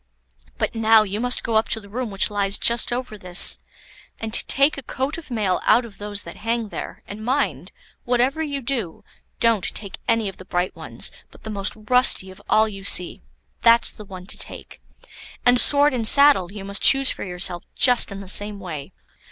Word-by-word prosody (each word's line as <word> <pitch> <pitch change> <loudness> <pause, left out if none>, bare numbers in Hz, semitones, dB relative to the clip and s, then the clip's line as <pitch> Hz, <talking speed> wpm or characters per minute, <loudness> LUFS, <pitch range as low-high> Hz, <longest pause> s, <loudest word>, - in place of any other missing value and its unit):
But - - -2
now 225 -1 +4
you 205 0 -5
must 245 +1 -1
go 230 - -3
up 220 - 0
to 225 - 0
the 200 - -15
room 240 +3 -5
which 195 +1 0
lies 200 -1 -1
just 235 0 +1
over 240 -3 -5
this, 180 -1 +5 0.6
and 220 -1 -6
take 275 +5 +2
a 275 - -7
coat 270 +5 -4
of 325 - -14
mail 210 -6 -1
out 240 - +3
of 215 -4 -14
those 205 0 -5
that 170 - -11
hang 225 0 -3
there; - - -8
and 210 +2 -9
mind, 265 +5 -2 0.3
whatever 250 +5 0
you 285 -3 -4
do, 235 -9 -4 0.4
don't 230 -5 +2
take 200 -3 -5
any 230 -2 +1
of 195 - -8
the 185 - -13
bright 180 0 -3
ones, - - -2 0.2
but - - -19
the 220 - -7
most 200 -1 0
rusty 215 -3 +2
of 185 - -15
all 220 0 +3
you 195 -2 -9
see, 180 -2 +1 0.4
that's 235 0 +4
the 215 - -12
one 185 -2 -11
to - - -7
take; - - -6 0.6
and 245 0 +5
sword 290 0 +6
and 230 -3 +1
saddle 280 -10 +5
you 200 -1 -9
must 200 +1 0
choose 270 -1 +4
for - - -7
yourself 180 -1 -1
just 245 -4 +2
in 200 - -7
the 195 -1 -10
same 205 +1 -1
way." 155 -7 -8
220 Hz, 200 wpm, -21 LUFS, 195-245 Hz, 0.6 s, sword